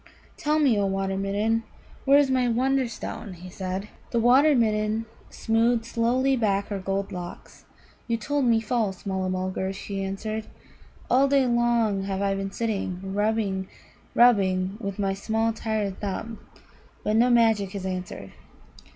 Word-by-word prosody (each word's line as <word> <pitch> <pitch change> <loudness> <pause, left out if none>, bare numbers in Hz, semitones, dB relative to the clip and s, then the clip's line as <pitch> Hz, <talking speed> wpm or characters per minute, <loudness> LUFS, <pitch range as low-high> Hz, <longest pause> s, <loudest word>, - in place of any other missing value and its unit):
"Tell 300 +1 0
me, 265 -9 +3
O 200 - +1
Water 195 0 -1
midden, 205 +4 0 0.4
where 275 +1 +6
is 285 -2 +3
my 255 -1 +2
Wonderstone?" 245 -4 -1
he 180 +1 -11
said. 190 +2 -4 0.2
The 235 - 0
Water 265 +6 +5
midden 215 -1 +1 0.2
smoothed 225 +1 +1
slowly 245 +4 +1
back 200 -4 0
her 200 -2 -3
gold 195 +1 -2
locks. 175 -1 -9 0.4
"You 230 -1 0
told 285 +5 -1
me 230 -2 +3
false, 215 -4 -2
Mulla 190 -1 -1
mulgar," 185 +1 -2
she 195 0 -5
answered. 215 +3 -4 0.6
"All 265 +3 +4
day 275 -1 +3
long 235 -5 +1
have 195 -1 -2
I 195 0 +1
been 195 0 -3
sitting 195 -4 -3
rubbing, 205 -2 0 0.5
rubbing 195 -5 +4
with 200 -4 -4
my 195 -2 0
small 225 +3 0
tired 215 -3 -2
thumb, 215 +3 -4 0.6
but 210 - +1
no 240 +3 +4
magic 225 -5 +3
has 195 -2 -5
answered. 180 - -5
215 Hz, 150 wpm, -25 LUFS, 195-235 Hz, 0.6 s, where